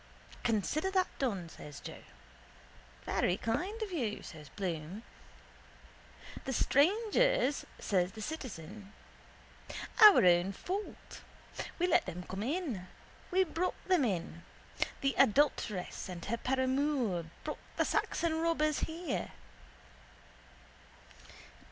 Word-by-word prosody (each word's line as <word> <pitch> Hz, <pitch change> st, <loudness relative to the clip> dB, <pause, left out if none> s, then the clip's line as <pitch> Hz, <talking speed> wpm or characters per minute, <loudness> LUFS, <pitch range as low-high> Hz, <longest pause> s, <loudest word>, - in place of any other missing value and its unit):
—Consider 240 Hz, -, +1 dB
that 375 Hz, -1 st, +2 dB
done, 200 Hz, -10 st, -1 dB
says 150 Hz, -3 st, -10 dB
Joe. -, -, -9 dB, 1.0 s
—Very 180 Hz, -, +1 dB
kind 365 Hz, -, -2 dB
of 415 Hz, -, -5 dB
you, 240 Hz, -, -2 dB
says 150 Hz, -3 st, -10 dB
Bloom. 175 Hz, -, -4 dB, 1.4 s
—The 265 Hz, -, -3 dB
strangers, 430 Hz, -, +3 dB
says 185 Hz, -1 st, 0 dB
the 220 Hz, -, -8 dB
citizen. 210 Hz, -, -7 dB, 1.1 s
Our 415 Hz, -, +10 dB
own 175 Hz, +2 st, +4 dB
fault. 390 Hz, -, -6 dB, 0.6 s
We 355 Hz, -, +2 dB
let 355 Hz, -2 st, +3 dB
them 180 Hz, +2 st, -5 dB
come 190 Hz, +2 st, -5 dB
in. 255 Hz, -, -2 dB, 0.4 s
We 375 Hz, +1 st, +4 dB
brought 350 Hz, +1 st, -1 dB
them 365 Hz, -6 st, +4 dB
in. 170 Hz, -6 st, -2 dB, 0.6 s
The 275 Hz, -1 st, +2 dB
adulteress 215 Hz, -8 st, +2 dB
and 175 Hz, -2 st, -6 dB
her 235 Hz, +3 st, -1 dB
paramour 260 Hz, -, +1 dB, 0.2 s
brought 305 Hz, -, -4 dB, 0.2 s
the -, -, +3 dB
Saxon 325 Hz, -1 st, 0 dB
robbers 310 Hz, -2 st, +2 dB
here. 330 Hz, +2 st, -3 dB
260 Hz, 105 wpm, -33 LUFS, -, 1.4 s, Our